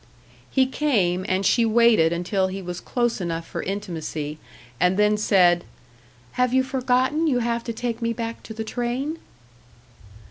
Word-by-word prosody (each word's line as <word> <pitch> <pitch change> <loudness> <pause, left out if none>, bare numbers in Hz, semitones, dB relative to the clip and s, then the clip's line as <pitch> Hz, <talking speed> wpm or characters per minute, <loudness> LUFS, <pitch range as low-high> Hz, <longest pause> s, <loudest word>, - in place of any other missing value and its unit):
He 265 - +3
came; 205 -10 0
and 190 +1 0
she 230 +5 +4
waited 225 -7 +4
until 185 +3 0
he 190 +1 -5
was 180 -1 -6
close 240 -4 -1
enough 165 -1 -3
for - - -5
intimacy, 160 -6 -4 0.4
and 180 +4 +3
then 210 0 +4
said, 180 -4 +3 0.7
"Have 250 0 +1
you 260 - +4
forgotten 260 +4 +1
you 265 -5 +2
have 235 -1 -1
to 235 - -2
take 235 0 -4
me 230 0 0
back 230 0 -5
to 220 - -9
the 220 - -3
train?" 250 +7 -3
220 Hz, 155 wpm, -23 LUFS, 185-245 Hz, 0.7 s, she